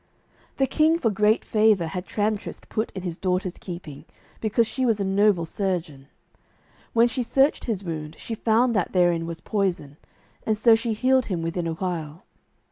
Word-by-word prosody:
The 270 - +3
king 315 +4 +3
for 230 -10 +1
great 210 +2 +2
favour 215 -5 +3
had 180 +3 -5
Tramtrist 210 0 -3
put 220 +1 -1
in 190 - -5
his 175 -2 -5
daughter's 185 -1 -1
keeping, 165 -5 -8 0.3
because 225 +1 +1
she 260 +4 -3
was 225 -4 +2
a - - 0
noble 195 -2 +3
surgeon. 165 -7 -3 0.9
When 235 +1 +5
she 240 +2 -3
searched 270 +4 +2
his 210 -5 -2
wound 155 -3 -5
she 230 - -6
found 230 +2 +2
that 195 - 0
therein 175 -2 +2
was 165 -1 -6
poison, 180 -8 -2 0.5
and 215 -1 0
so 230 +2 +5
she 225 0 +1
healed 255 +3 +2
him 175 -5 -2
within 165 +1 -2
a 165 - -1
while. 165 -2 -4
195 Hz, 175 wpm, -24 LUFS, 170-225 Hz, 0.9 s, When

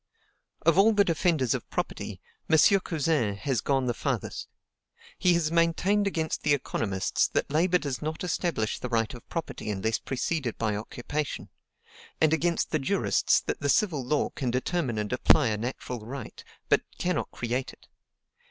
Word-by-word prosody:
Of 165 +3 +4
all 220 +3 +6
the 205 -1 +4
defenders 160 - +1
of - - -5
property, - - -4 0.3
M. 160 - +5 0.2
Cousin 150 - 0
has 125 +2 -1
gone 135 -1 +1
the 120 - 0
farthest. - - -3 0.7
He 180 -1 +4
has 160 -2 +1
maintained 170 +5 +2
against 160 -5 -2
the 145 -1 +3
economists 100 -7 0
that - - -1
labor 175 +4 +3
does 140 -5 -4
not 155 +3 -4
establish 170 - -1
the 125 - -4
right 115 -2 0
of 120 - -12
property 165 -9 -4
unless 110 +3 -1
preceded 135 -1 -2
by 110 -2 0
occupation, 125 +7 -4 0.7
and 160 0 +4
against 170 +2 0
the 155 - +1
jurists 135 - +2
that - - -3
the 145 - -1
civil 155 -6 +2
law 145 +4 0
can 130 -4 -3
determine 130 0 -1
and 105 +2 -2
apply 130 +1 +4
a 105 - -1
natural 125 +1 -4
right, 125 +1 -8 0.2
but - - +4 0.2
cannot 180 -3 -1
create 120 +2 -3
it. - - -20
145 Hz, 160 wpm, -28 LUFS, 120-165 Hz, 0.7 s, all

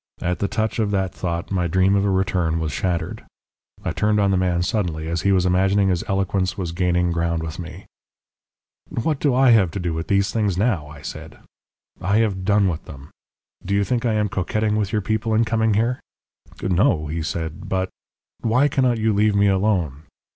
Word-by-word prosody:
At 90 +1 -2
the 100 - 0
touch 110 +2 -2
of 110 -2 +1
that 95 -2 -1
thought 85 0 -4
my 90 -3 0
dream 95 +3 +3
of 100 - +2
a 100 - +1
return 90 -4 0
was 80 -2 -2
shattered. 85 +2 -2 0.6
I - - 0
turned 105 0 +1
on 100 -1 +3
the - - +2
man 90 -2 +1
suddenly, 85 -5 -2
as 85 +1 -1
he 100 - +2
was 95 -2 +3
imagining 95 +2 +3
his 90 -2 0
eloquence 95 -1 0
was 90 -4 -3
gaining 90 0 +1
ground 85 -1 -1
with 80 +1 -6
me. 85 -1 -8 1.0
"'What 145 +5 -2
have 145 -4 +2
I 120 -5 +6
to 85 +4 -5
do 85 -2 -2
with 80 +1 -4
these 100 0 +2
things 105 -5 0
now?' 95 -8 0
I 75 0 -12
said. - - -8 0.6
'I 100 +2 +1
have 100 -4 0
done 100 0 +3
with 85 -3 -3
them. 70 0 -11 0.5
Do 100 +2 -1
you 100 - +3
think 120 +3 -1
I 115 -3 +1
am 105 -1 +1
coquetting 105 +2 -1
with 105 -3 -1
your 105 -2 0
people 110 +1 0
in 115 +1 +3
coming 110 -1 +1
here?' 120 +4 +1 0.6
"'No,' 90 -4 +2
he 80 +2 -3
said; 80 +4 -4
'but 95 0 -1 0.3
' - - -71
"'Why 125 +5 +3
cannot 130 -4 +1
you 110 0 +1
leave 105 +1 +2
me 100 0 +4
alone? 95 -7 0
95 Hz, 205 wpm, -22 LUFS, 85-105 Hz, 1.0 s, I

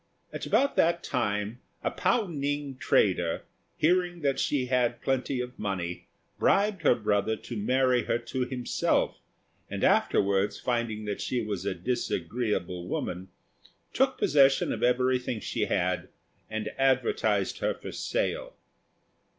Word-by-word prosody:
About 280 +1 +1
that 170 +1 +3
time 105 -2 -1 0.2
a - - 0
Pao 230 -3 +1
ning 145 -4 -3
trader, 90 -9 +2 0.3
hearing 175 +1 +2
that 140 -2 +1
she 135 -3 +1
had 125 -1 +1
plenty 135 0 -1
of 125 0 -5
money, 90 -4 -3 0.3
bribed 200 -2 +3
her 145 - +5
brother 105 -1 +1
to 120 - -8
marry 125 +2 +2
her - - +1
to 125 +2 -3
himself; 125 -1 0 0.5
and - - -4
afterwards, 100 0 +2
finding 115 -3 -1
that 105 -1 -3
she 125 -2 -1
was 100 -3 -3
a 95 - -1
disagreeable 90 -3 -2
woman, 90 +1 -3 0.7
took 265 0 +2
possession 135 -2 +4
of - - -5
everything 125 -1 +1
she - - -1
had, 90 0 0 0.4
and 110 -1 -3
advertised 135 - +2
her - - 0
for - - -8
sale. - - -2
125 Hz, 130 wpm, -28 LUFS, 105-140 Hz, 0.7 s, her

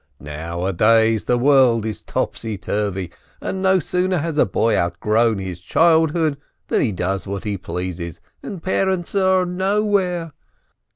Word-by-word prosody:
Nowadays 95 +9 +1
the 125 - +2
world 125 -4 +4
is 110 -1 -4
topsyturvy, 100 -3 -3 0.3
and 190 - -4
no 190 0 +4
sooner 180 +2 0
has 155 -1 -2
a - - +4
boy 115 +4 +1
out 85 0 -1
grown 110 +2 +2
his 95 -2 -6
childhood 160 - +2 0.3
than - - +2
he 115 - +1
does 95 +1 -2
what 100 -1 -4
he 105 -2 -2
pleases, 90 -2 -5 0.2
and 190 -5 -8
parents 190 -2 0
are 190 -2 +3
nowhere. 185 -3 0
115 Hz, 135 wpm, -20 LUFS, -, 0.3 s, world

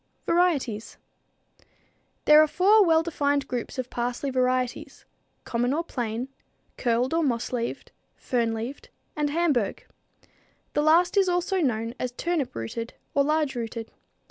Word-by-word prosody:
Varieties. 290 -11 0 1.3
There 300 0 +8
are 310 - +4
four 405 +7 +5
well 325 -3 +4
defined 285 -4 0
groups 245 0 -4
of 255 -1 -4
parsley 245 +3 -2
varieties; 255 -1 -1 0.4
common 245 +3 0
or 330 - -1
plain, 240 -5 -3 0.5
curled 245 +3 0
or 335 - +2
moss 250 -5 -1
leaved, 235 -1 -3 0.2
fern 235 -3 -1
leaved, 230 +5 -6 0.3
and 295 -1 0
Hamburg. 290 - 0 0.9
The 295 - +2
last 340 +5 +4
is 385 -2 +4
also 355 +2 0
known 230 -6 0
as 250 - -2
turnip 325 -1 -2
rooted 170 - -5 0.2
or 280 - +3
large 305 -1 +1
rooted. 230 -2 -5
265 Hz, 135 wpm, -26 LUFS, 235-320 Hz, 1.3 s, There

